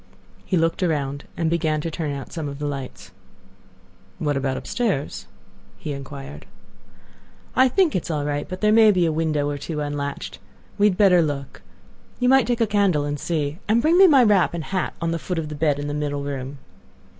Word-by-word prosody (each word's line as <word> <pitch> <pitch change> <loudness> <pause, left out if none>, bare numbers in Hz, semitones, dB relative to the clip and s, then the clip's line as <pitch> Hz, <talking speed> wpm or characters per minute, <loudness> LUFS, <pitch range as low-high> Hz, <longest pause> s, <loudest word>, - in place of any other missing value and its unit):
He 185 - 0
looked 165 +2 +1
around, 145 -5 -1
and 165 - 0
began 160 -2 0
to 165 - -4
turn 155 -2 -3
out 140 -2 -7
some 155 -4 -4
of 140 - -7
the 150 - -4
lights. 140 -3 -6 1.1
"What 145 -2 -1
about 135 -1 -1
upstairs?" 210 - -2 0.5
he 150 - -5
inquired. 140 +1 -9 1.1
"I 260 +1 +6
think 345 - +2
it 180 - -1
is - - -7
all 150 -3 -1
right; 145 0 -3
but 185 0 -6
there 210 0 +4
may 220 0 +7
be 185 -4 +3
a 165 - +1
window 155 -2 0
or 145 -1 -3
two 155 +1 -4
unlatched. 145 -1 -4 0.4
We 205 - +6
had 185 -3 0
better 185 -4 +5
look; 145 -4 -4 0.6
you 250 - +2
might 265 -3 +5
take 240 -1 0
a - - +5
candle 200 -8 +2
and 145 0 -3
see. 155 0 -2
And 220 +3 +3
bring 325 +8 +3
me 385 - +9
my 275 -6 +6
wrap 200 -6 +3
and 165 - -4
hat 190 +2 -2
on 165 -1 -1
the 165 - -2
foot 180 +2 -4
of 155 -2 -3
the - - -6
bed 145 -1 +1
in 145 - -4
the 145 - -3
middle 145 -1 -2
room." 140 0 -5
155 Hz, 210 wpm, -23 LUFS, 145-190 Hz, 1.1 s, me